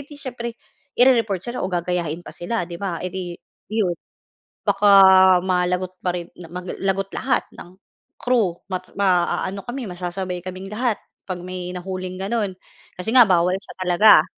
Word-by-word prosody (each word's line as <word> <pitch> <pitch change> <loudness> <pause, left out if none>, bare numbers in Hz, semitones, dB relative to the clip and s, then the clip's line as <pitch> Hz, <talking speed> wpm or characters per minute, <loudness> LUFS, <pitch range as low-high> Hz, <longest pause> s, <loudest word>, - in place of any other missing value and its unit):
'di 290 +1 -11
siyempre 240 -4 -6 0.4
i-re-report 230 -7 +3
sila 240 +1 -4
o 185 - -1
gagayahin 175 -2 -2
pa - - -9
sila 180 +1 -2
'di 170 +1 -9
ba, 185 -4 -2
eh 185 - -4
'di 180 -2 -5 0.3
iyon. 210 -5 +1 0.7
Baka 205 - +3 0.6
malagot 180 0 0
pa 180 -1 0
rin 175 -1 -6
na 175 -2 -10
ma 180 0 -6
mag - - -5
lagot 195 0 0
lahat 260 -1 +1
ng 175 +1 -12 0.4
crew, 225 -8 +1
ma 185 -1 -2 0.2
maaano 190 0 +1
kami 250 0 -4
masasabay 180 0 -4
kaming 185 +1 -7
lahat 230 0 0 0.3
kapag 180 -1 -4
may 180 -1 -5
nahuling 185 0 -5
ganon, 200 -2 -1 0.4
kasi 185 +5 -2
nga 245 - +10
bawal 180 0 +3
siya 195 - -13
talaga. 180 -1 +6
185 Hz, 165 wpm, -22 LUFS, 180-215 Hz, 0.7 s, nga